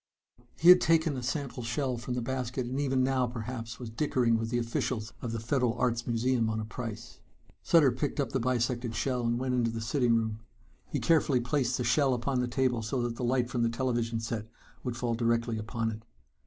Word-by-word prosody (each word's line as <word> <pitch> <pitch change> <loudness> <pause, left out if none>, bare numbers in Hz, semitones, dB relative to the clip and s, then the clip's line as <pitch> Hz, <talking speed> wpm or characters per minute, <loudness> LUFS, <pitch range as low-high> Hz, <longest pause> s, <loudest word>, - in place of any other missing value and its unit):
He 170 - +5
had 180 0 +10
taken 160 -2 +3
a 130 - -4
sample 135 0 -3
shell 125 +2 -1
from 120 +1 -4
the 125 - -2
basket 130 0 -2
and 130 +3 -3
even 135 -2 +1
now 130 -1 +2
perhaps 115 0 -6
was 120 -3 -7
dickering 120 -2 +1
with 115 0 -1
the 120 - 0
officials 115 -1 -2
of 120 - -3
the 115 - -3
Federal 120 +1 0
Arts 120 -1 0
Museum 120 0 +1
on 110 0 -1
a 110 - -3
price. 115 -1 -7 0.4
Sutter 155 -6 +5
picked 145 +5 -3
up 140 - 0
the 130 - 0
bisected 120 -1 -1
shell 125 +2 -1
and 120 0 +1
went 130 0 -1
into 120 -2 +2
the 115 0 -4
sitting 120 +1 +2
room. 110 -1 -1 0.5
He - - -1
carefully 150 -5 +3
placed 125 0 0
the 125 - -1
shell 130 +2 +3
upon 125 +2 -1
the 125 - 0
table 125 -1 +1
so 115 +4 -2
that 120 -1 -2
the 125 - -5
light 125 0 +1
from 125 -1 -2
the 115 - +3
television 115 -1 -1
set 115 -1 -4 0.4
would 125 -2 -3
fall 120 -1 -1
directly 115 -1 0
upon 115 +1 -2
it. 110 0 -7
120 Hz, 215 wpm, -30 LUFS, 115-130 Hz, 0.5 s, had